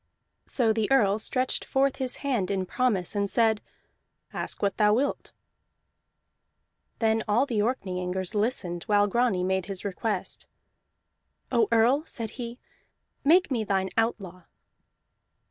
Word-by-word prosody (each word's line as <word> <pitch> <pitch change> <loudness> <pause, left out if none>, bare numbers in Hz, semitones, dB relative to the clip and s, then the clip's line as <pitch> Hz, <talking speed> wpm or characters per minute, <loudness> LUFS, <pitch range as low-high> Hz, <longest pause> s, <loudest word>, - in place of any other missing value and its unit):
So 230 -4 +2
the 220 -1 -1
Earl 210 -6 +4
stretched 255 +3 0
forth 270 0 +1
his 260 -2 0
hand 235 -10 0
in 190 -2 -1
promise, 205 -4 0
and 200 -1 -1
said: 220 -2 +2 0.7
"Ask - - -4
what 200 -2 0
thou 210 0 +4
wilt." 275 +4 -1 1.7
Then 225 -1 +1
all 225 +6 +3
the 235 -6 -2
Orkneyingers 185 -4 -2
listened 205 -5 -1
while 205 -1 +3
Grani 205 -3 +1
made 190 0 0
his 195 0 -6
request. 200 0 -3 1.0
"Oh 235 -4 +3
Earl," 240 +6 +4
said 225 -4 -4
he, 235 -1 -7 0.7
"make 335 +2 +4
me 235 -4 0
thine 190 -2 -1
outlaw!" 195 -6 -2
220 Hz, 130 wpm, -27 LUFS, 195-245 Hz, 1.7 s, Earl